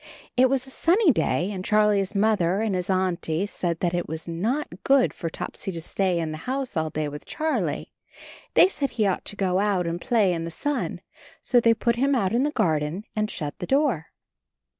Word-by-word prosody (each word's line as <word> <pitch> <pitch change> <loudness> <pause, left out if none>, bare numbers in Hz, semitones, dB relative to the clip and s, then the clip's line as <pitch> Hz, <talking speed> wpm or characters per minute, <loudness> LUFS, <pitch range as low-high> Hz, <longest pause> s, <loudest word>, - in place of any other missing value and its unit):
It 255 +1 +5
was 265 -1 0
a 265 - -9
sunny 350 +5 +4
day, 195 -4 0
and 185 -2 -5
Charlie's 210 -1 +2
Mother 200 -3 +2
and 220 -3 0
his 180 +1 -2
Auntie 185 -2 0
said 175 -4 -3
that 175 -1 +1
it 175 - -1
was 160 +1 -5
not 195 - -3
good 270 -2 +4
for 165 - -4
Topsy 190 - -5
to 165 - -5
stay 185 +2 0
in 165 -2 -2
the 155 - -6
house 265 -3 -2
all 160 -1 0
day 155 0 -2
with 145 0 -7
Charlie; 315 0 -2 0.6
they - - +8
said 285 -7 -2
he 215 - +3
ought 190 -2 0
to - - -3
go 190 -2 +1
out 200 -3 +1
and 170 +1 -3
play 220 -7 +2
in 165 -1 -3
the 165 - -4
sun, 290 - -3 0.4
so 245 - +3
they 230 -1 +4
put 235 +1 0
him 275 +2 +2
out 195 -6 +1
in 240 - +3
the 290 - +2
garden 160 - 0
and 215 0 0
shut 150 -7 -5
the 180 - -5
door. 265 - +1
195 Hz, 210 wpm, -25 LUFS, 170-245 Hz, 0.6 s, they